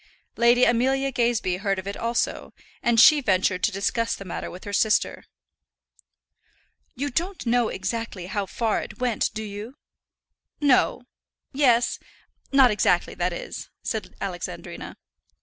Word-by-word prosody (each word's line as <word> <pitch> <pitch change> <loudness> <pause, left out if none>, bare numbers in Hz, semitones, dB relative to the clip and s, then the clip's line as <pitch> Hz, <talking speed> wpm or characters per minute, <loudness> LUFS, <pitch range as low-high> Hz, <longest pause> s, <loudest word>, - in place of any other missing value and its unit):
Lady 240 +1 +4
Amelia 265 +3 +2
Gazebee 235 -7 0
heard 195 0 -1
of 190 - -5
it 200 - -4
also, 235 +1 -2 0.3
and 235 -1 +3
she 295 +4 +8
ventured 185 -4 +1
to - - +2
discuss 230 +4 -1
the 195 - -10
matter 180 - -5
with 180 - -10
her 205 - -7
sister. 215 +1 +1 1.7
"You 285 +3 -3
don't 350 +6 -2
know 240 -1 +2
exactly 220 -2 -4
how 195 +1 -3
far 225 +2 -1
it - - -10
went, 245 -3 0
do 220 - -3
you?" 210 +5 -7 0.8
"No; 270 -3 +3 0.5
yes; 245 -4 +3 0.5
not 270 -3 +6
exactly, 180 -4 +2
that 175 +1 -1
is," 175 - -7
said - - -4
Alexandrina. - - -6
230 Hz, 135 wpm, -24 LUFS, 200-250 Hz, 1.7 s, she